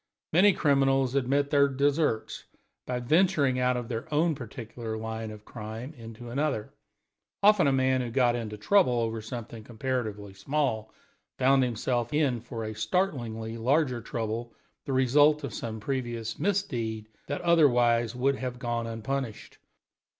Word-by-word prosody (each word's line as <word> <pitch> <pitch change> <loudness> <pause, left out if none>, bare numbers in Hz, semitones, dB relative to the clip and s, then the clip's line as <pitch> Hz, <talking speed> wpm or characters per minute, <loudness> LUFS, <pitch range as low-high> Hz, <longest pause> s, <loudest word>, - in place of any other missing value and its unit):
Many 190 +4 +6
criminals 135 -4 +2
had 135 -3 +1
met 140 +1 +1
their 140 -1 +5
deserts 140 -3 0 0.4
by 125 -1 -1
venturing 145 -1 +2
out 125 0 +2
of 120 -2 -4
their 115 +2 -5
own 160 +2 +2
particular 115 -3 -6
line 110 0 -5
of 105 0 -11
crime 115 +5 -7
into 115 -2 -10
another; 135 -5 -1 0.7
often 205 -6 +6
a - - +4
man 130 -1 +2
who 120 - -3
got 120 0 +2
into 110 -3 -4
trouble 180 - +3
over 115 -1 -2
something 115 0 -7
comparatively 110 -4 -4
small 110 -1 -1 0.5
found 135 +1 +4
himself 120 0 -1
in 140 -6 +2
for 120 -1 -6
a 110 0 -4
startlingly 115 - -2
larger 130 0 +1
trouble, 115 0 -4 0.3
the - - -3
result 145 +4 +4
of 135 -6 -5
some 110 -1 -5
previous 120 -2 -3
misdeed 120 - -1 0.2
that 145 - -3
otherwise 120 -8 +3
would 135 +2 +1
have 125 -1 -4
gone 120 -1 -2
unpunished. 115 +1 -4
125 Hz, 145 wpm, -28 LUFS, 115-140 Hz, 0.7 s, Many